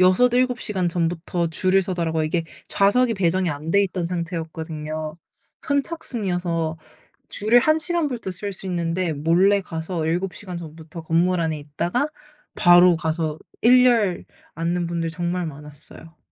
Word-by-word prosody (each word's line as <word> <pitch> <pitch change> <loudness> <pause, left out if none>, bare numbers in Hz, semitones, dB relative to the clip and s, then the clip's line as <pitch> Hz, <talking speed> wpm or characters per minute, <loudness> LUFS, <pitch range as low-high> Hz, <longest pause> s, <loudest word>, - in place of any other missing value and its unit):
6-7 245 +7 +4
시간 190 -4 -1
전부터 170 0 -1
줄을 185 +4 +2
서더라고요. 170 -4 -1
이게 165 +2 -1 0.2
좌석이 230 +4 +3
배정이 185 -1 +1
안 150 +2 -5
돼 200 +3 +4
있던 185 -2 -3
상태였거든요. 160 -2 -4 0.4
선착순이어서 190 - -1 0.5
줄을 215 +4 +3
1 310 +5 +3
시간부터 305 - -2
설 200 +3 -4
수 190 - -7
있는데 175 -1 -1
몰래 175 +7 +3
가서 165 -1 -4
7 175 +2 -1
시간 180 +2 -7
전부터 160 0 -9
건물 170 +3 +2
안에 160 -2 -1
있다가 170 - -2 0.5
바로 175 -1 +6
가서 160 -2 -2 0.2
1 250 +2 +7
열 215 -8 +2 0.3
앉는 170 +1 -1
분들 170 -1 -2
정말 175 +1 -2
많았어요. 150 +2 -9
175 Hz, 285 characters per minute, -23 LUFS, 165-195 Hz, 0.5 s, 1